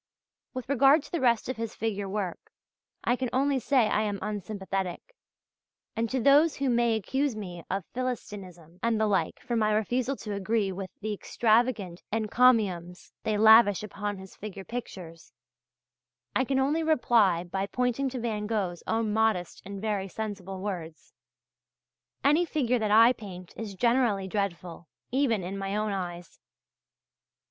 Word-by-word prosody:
With 255 -1 -5
regard 280 +3 +5
to - - -14
the 340 - -1
rest 235 -3 +2
of 255 - -3
his 230 -1 -4
figure 205 -3 -2
work, 195 -3 -4 0.5
I 245 - +2
can 255 -1 -2
only 275 +1 +2
say 255 -2 +3
I 215 - +1
am 205 -2 -1
unsympathetic. 195 - -4 0.8
And 230 0 -1
to 265 - -1
all 245 - -1
those 290 +3 +5
who 275 -2 0
may 235 -1 +3
accuse 265 +4 -1
me 180 -5 -7
of 195 -2 -2
Philistinism 190 -9 -6
and 230 -1 +1
the 220 - +3
like 190 -6 0
for 240 - -3
my 215 -2 +2
refusal 245 +5 0
to 210 -5 -6
agree 200 0 0
with 190 0 -6
the 215 0 -2
extravagant 215 -4 +1
encomiums 215 -6 +2
they 215 -1 0
lavish 220 -2 +6
upon 205 0 -4
his 190 0 -12
figure 195 -2 -8
pictures, 180 -9 -8 1.0
I 260 - +2
can 270 +1 0
only 285 +5 +2
reply 235 - +3
by 190 +2 -3
pointing 250 +4 0
to 255 0 -5
Van 215 -3 -2
Gogh's 195 -6 -2
own 225 -1 0
modest 220 -5 0
and 200 0 -6
very 205 -2 -2
sensible 195 -2 -6
words: 170 -6 -6 1.1
"Any 300 +5 +4
figure 255 -7 0
that 215 -1 0
I 225 +4 +7
paint 185 -6 -10
is 210 -3 -6
generally 235 -4 +2
dreadful, 180 -4 -4 0.2
even 245 -7 +1
in 195 +3 -5
my 195 +1 -3
own 215 0 0
eyes. 175 -3 -5
215 Hz, 155 wpm, -28 LUFS, 195-245 Hz, 1.1 s, I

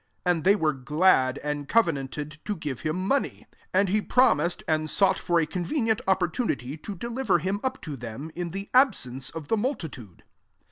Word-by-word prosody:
5 180 - +4
And 165 -3 -4
they 195 +4 +6
were 155 -6 +1
glad, 135 -1 +3
and 145 -1 -3
co 230 0 +6
venanted 150 -1 -5
to 210 - -2
give 145 -7 -5
him 175 +5 -2
money. 280 +4 0
6 - - -30 0.2
And 195 0 +4
he 210 +3 +2
promised, 235 -8 +2
and 155 -1 0
sought 195 +4 +3
for 175 -1 +1
a 165 - +2
convenient 220 - 0
opportunity 180 - 0
to 200 +6 -7
deliver 235 +2 0
him 190 +5 -2
up 260 0 -2
to 150 -4 -5
them, 125 +5 -7
in 175 0 -4
the 195 +4 -5
absence 135 - +2
of 160 -3 -7
the 225 - +1
multitude. 160 - -4
170 Hz, 190 wpm, -26 LUFS, 150-205 Hz, 0.2 s, they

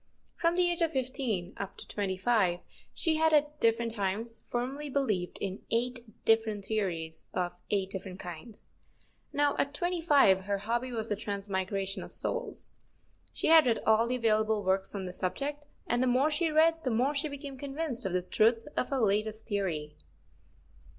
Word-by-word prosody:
From 335 0 +1
the 360 0 +4
age 345 - -2
of 330 -1 +2
fifteen 250 -8 -1
up 200 -1 -6
to - - -10
twenty 195 -2 -2
five 190 -5 +2 0.3
she 320 -2 +1
had 320 0 +3
at 300 0 +2
different 230 0 +2
times 220 +3 -1
firmly 270 +5 -3
believed 215 -10 -1
in 195 0 -4
eight 245 +2 +1 0.3
different 220 -3 +2
theories 170 -7 -2
of 180 -1 -1 0.2
eight 195 -2 0
different 190 -1 -5
kinds. 175 +6 -9 0.6
Now, 290 0 +2
at 285 +1 0
twenty 350 +2 -1
five, 240 - +5
her 200 0 0
hobby 235 +5 -2
was 225 -2 -3
the 210 - +1
transmigration 195 -1 -2
of - - -8
souls. - - -3 0.6
She - - -1
had 320 -4 +8
read 230 - +3
all 220 +1 +4
the 250 - 0
available 220 -2 +2
works 190 +2 0
on 195 -2 -3
this 180 0 -7
subject, 285 +10 -3 0.2
and 240 +1 +1
the 255 - +2
more 260 +5 +3
she 330 +2 +1
read 325 +1 +3
the 255 - 0
more 250 +5 +2
she 295 +1 0
became 285 -1 -7
convinced 280 -1 -4
of 190 -3 -2
the 180 0 +1
truth 225 +5 +2
of - - 0
her 275 - 0
latest 215 -1 0
theory. 170 -8 -2
225 Hz, 175 wpm, -30 LUFS, 195-280 Hz, 0.6 s, had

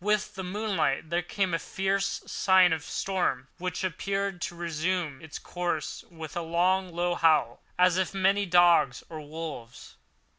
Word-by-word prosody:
With 210 0 +1
the 190 - -6
moonlight 180 -6 -1
there 175 +1 +2
came 185 +1 -1
a 165 - +1
fierce 195 +3 -1
sigh 190 -1 +4
of 180 - +5
the - - -10
storm, 175 -9 -1
which 180 +1 -3
appeared 195 +1 -2
to 175 - -4
resume 170 -3 -2
its 160 -2 -8
course 175 -3 -3
with 160 -3 -9
a 175 - -1
long, 180 +3 +1
low 175 +1 0
howl, 155 -9 +2 0.2
as 180 0 +4
of 190 +1 -1
many 195 +1 +2
dogs 175 -7 +4
or 155 -2 -7
wolves. 150 -6 -8
175 Hz, 160 wpm, -28 LUFS, 160-190 Hz, 0.2 s, of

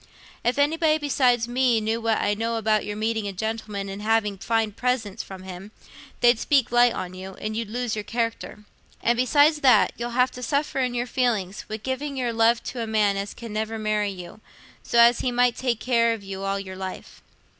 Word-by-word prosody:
If 240 +3 +1
anybody 310 +2 +3
besides 255 -5 +2
me 245 -1 +2
knew 220 +2 -1
what 225 -1 +1
I 205 - +1
know 230 +2 -2
about 215 -1 +1
your 210 0 -5
meeting 220 -1 -1
a - - -3
gentleman 215 0 -4
and 195 +1 -6
having 210 -2 +1
fine 225 0 0
presents 235 -3 -2
from 190 -1 -10
him, 190 +2 -9 0.5
they'd 240 -1 +5
speak 270 -3 +2
light 240 0 +5
on 185 -1 -5
you, 190 +1 -8
and 215 0 -5
you'd 225 -2 -3
lose 240 0 -2
your 215 - -2
character. 230 -2 -3 0.4
And 235 - +3
besides 290 +5 +4
that, 245 -7 +5
you'll 235 0 -3
have 250 0 +3
to 250 - -9
suffer 280 +2 -1
in 250 -2 0
your 240 0 -1
feelings, 225 -7 -1
wi' 215 - -3
giving 265 +5 -4
your 245 -2 -1
love 230 +1 +3
to 245 - -5
a 225 - -3
man 210 -2 +2
as 200 +1 -4
can 230 -3 -8
never 220 +1 -2
marry 215 -1 0
you, 180 +1 -9 0.4
so 235 - -2
as 235 +1 +6
he 255 - -1
might 245 0 +2
take 245 -3 -1
care 235 -2 +2
of 220 -3 -7
you 195 0 -6
all 195 0 -1
your 190 -1 -7
life." 190 0 -8
225 Hz, 210 wpm, -24 LUFS, 210-245 Hz, 0.5 s, as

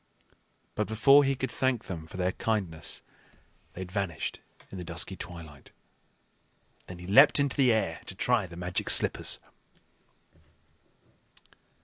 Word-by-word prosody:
But 105 - -2
before 135 +6 +5
he 135 0 +1
could 130 0 -4
thank 130 -3 -1
them 80 -4 -7
for 95 - -11
their 90 0 0
kindness, 95 -8 -3 0.7
they 95 - -8
had 90 -1 -8
vanished 95 -5 -3 0.3
in 95 - -7
the - - -6
dusky 85 +2 -2
twilight. 80 -6 -11 1.2
Then 90 - -9
he 90 - -11
leaped 135 +11 +6
into 140 -1 +1
the 130 -4 +4
air 95 -8 -1
to 95 - -5
try 115 0 +1
the 85 - -12
Magic 90 0 -2
Slippers. - - +4
95 Hz, 135 wpm, -28 LUFS, 85-125 Hz, 1.2 s, leaped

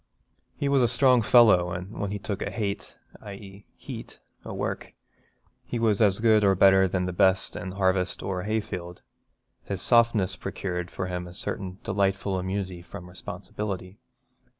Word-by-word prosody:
He 140 - -1
was 140 -1 +3
a 120 - +4
strong 125 0 +4
fellow 105 -6 +5
and 90 +2 -6
when 100 - -2
he 105 - -3
'took 100 0 -4
a - - -2
hate 100 -3 -4 0.2
(i.e. 100 0 -11
heat) - - -9 0.2
o' - - -7
work' - - -4 0.7
he - - -4
was 115 -2 +2
as 100 -2 +4
good 110 -1 +4
or 100 -1 +4
better 95 0 +6
than 90 0 -1
the 90 - -3
best 95 +2 +2
in 95 0 -5
harvest 95 -1 0
or 95 -1 -2
hayfield. 95 -4 -4 0.6
His 100 -2 -3
softness 115 -6 +3
procured 90 -2 -4
for 95 - -4
him 90 -1 -4
a 90 - -11
certain 95 0 -5
delightful 95 -1 0
immunity 95 -1 -3
from 85 +1 -10
responsibility. 95 +2 -6
95 Hz, 160 wpm, -26 LUFS, 90-105 Hz, 0.7 s, better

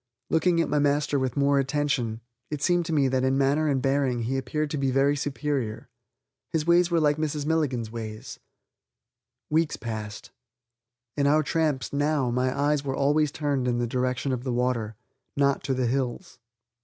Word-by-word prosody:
Looking 170 +1 +3
at 165 - +2
my 150 - +1
master 145 0 +1
with 130 0 -2
more 140 0 +3
attention, 135 -5 -1 0.3
it 150 -2 -4
seemed 175 -2 +2
to - - -3
me 145 -4 +3
that 130 0 0
in 130 +1 +2
manner 140 +3 +2
and 140 -3 +1
bearing 135 -3 +1
he 125 +4 -1
appeared 145 +3 -2
to 150 - -2
be 135 -1 +1
very 135 +2 +3
superior. 140 -5 -3 0.6
His 155 -2 0
ways 170 +1 +4
were 170 -1 +2
like 150 -1 +2
Mrs. 150 -2 -2
Milligan's 140 -8 0
ways.... 110 -2 -7 1.1
Weeks 160 0 +1
passed. 110 -2 -6 0.9
On 140 - +3
our 155 +2 +4
tramps, 150 -4 -1
now, 145 -3 +1
my 125 +1 +1
eyes 145 0 +1
were 135 -1 -2
always 145 +2 +2
turned 140 -4 -1
in 120 -1 +1
the 120 - 0
direction 125 +2 -1
of 125 -1 -2
the 130 - -2
water, 120 -3 -1 0.4
not 140 -1 +2
to 135 -1 0
the 130 -1 0
hills. 125 0 -2
140 Hz, 180 wpm, -26 LUFS, 125-150 Hz, 1.1 s, ways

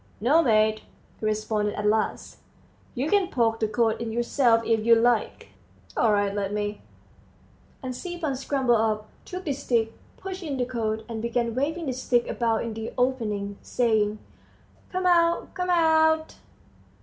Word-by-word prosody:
"No, 285 +9 +4
mate," 215 -4 +3 0.4
he - - -4
responded 215 -1 -1
at 210 - -3
last, 215 +1 -1 0.6
"you 260 +4 -1
can 395 +2 +3
poke 230 -8 +1
the 220 - +1
coat 225 +1 0
in 230 -1 -3
yourself, 235 0 +2
if 225 -2 +1
you 230 +1 +6
like." 230 - +1 0.5
"All 230 - +3
right, 205 -1 +1
let 200 -1 -2
me." 210 0 -3 1.0
And 255 -1 -4
Stepan 345 -3 -4
scrambled 260 -3 +1
up, 215 -1 -1 0.2
took 365 +1 -6
the 290 - 0
stick, 230 -4 0 0.2
pushed 380 0 -7
in 295 -6 -4
the 250 - 0
coat, 220 -3 -3
and 225 -2 -5
began 235 0 -1
waving 310 +7 -2
the 265 - -2
stick 245 -1 0
about 230 -2 0
in 230 -1 -4
the 225 +1 -5
opening, 210 -6 -1
saying, 215 -3 +1 0.7
"Come 370 0 -2
out, 340 -1 +3
come 360 -1 -3
out!" 320 -2 +3
235 Hz, 160 wpm, -25 LUFS, 220-285 Hz, 1.0 s, you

